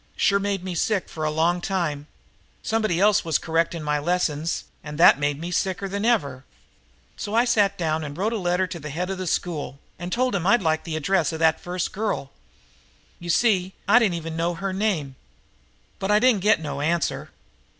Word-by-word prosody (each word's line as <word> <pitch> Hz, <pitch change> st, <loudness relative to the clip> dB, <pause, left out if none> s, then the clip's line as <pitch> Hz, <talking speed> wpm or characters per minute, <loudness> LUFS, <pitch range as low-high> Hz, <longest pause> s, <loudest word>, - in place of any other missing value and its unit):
Sure 200 Hz, -1 st, +3 dB
made 200 Hz, -2 st, -2 dB
me 185 Hz, -1 st, -4 dB
sick 195 Hz, +3 st, 0 dB
for 155 Hz, -, -6 dB
a 155 Hz, -, +1 dB
long 165 Hz, +3 st, +1 dB
time. 165 Hz, -7 st, -2 dB, 0.6 s
Somebody 215 Hz, -7 st, 0 dB
else 210 Hz, +1 st, +4 dB
was 160 Hz, -3 st, +1 dB
correcting 165 Hz, 0 st, -1 dB
my 150 Hz, 0 st, 0 dB
lessons, 165 Hz, -1 st, -1 dB, 0.2 s
and 150 Hz, 0 st, -7 dB
that 165 Hz, -3 st, +7 dB
made 145 Hz, 0 st, -1 dB
me 170 Hz, +2 st, -5 dB
sicker 190 Hz, +2 st, -1 dB
than 200 Hz, +2 st, -3 dB
ever. 140 Hz, -, +1 dB, 0.7 s
"So 205 Hz, -, -4 dB
I 235 Hz, +2 st, +4 dB
sat 205 Hz, -4 st, +2 dB
down 160 Hz, -2 st, -1 dB
and 145 Hz, -1 st, -7 dB
wrote 215 Hz, +5 st, 0 dB
a 225 Hz, -, -1 dB
letter 180 Hz, 0 st, +1 dB
to 180 Hz, -2 st, -7 dB
the 150 Hz, 0 st, -7 dB
head 180 Hz, +6 st, -3 dB
of 190 Hz, -, -4 dB
the 185 Hz, -, -4 dB
school 155 Hz, -5 st, -2 dB, 0.2 s
and 175 Hz, +1 st, -5 dB
told 250 Hz, +2 st, +1 dB
him 180 Hz, -2 st, -1 dB
I'd 235 Hz, 0 st, +4 dB
like 160 Hz, -1 st, +2 dB
to -, -, -7 dB
get -, -, -4 dB
the -, -, -1 dB
address 165 Hz, +1 st, +1 dB
of -, -, -3 dB
that 160 Hz, 0 st, +2 dB
first 180 Hz, -1 st, -3 dB
girl. 200 Hz, -10 st, -3 dB, 0.9 s
You 175 Hz, -, -8 dB
see, 190 Hz, -1 st, +2 dB
I 230 Hz, +5 st, +7 dB
didn't 205 Hz, -7 st, +1 dB
even 165 Hz, -1 st, -5 dB
know 170 Hz, +1 st, -1 dB
her 195 Hz, +2 st, -3 dB
name. 180 Hz, -10 st, -1 dB, 0.8 s
But 195 Hz, -, -3 dB
I 210 Hz, -, +5 dB
didn't 235 Hz, -3 st, +3 dB
get 210 Hz, -2 st, +4 dB
no 145 Hz, -3 st, -4 dB
answer." 165 Hz, +3 st, -1 dB
175 Hz, 210 wpm, -24 LUFS, 160-200 Hz, 0.9 s, that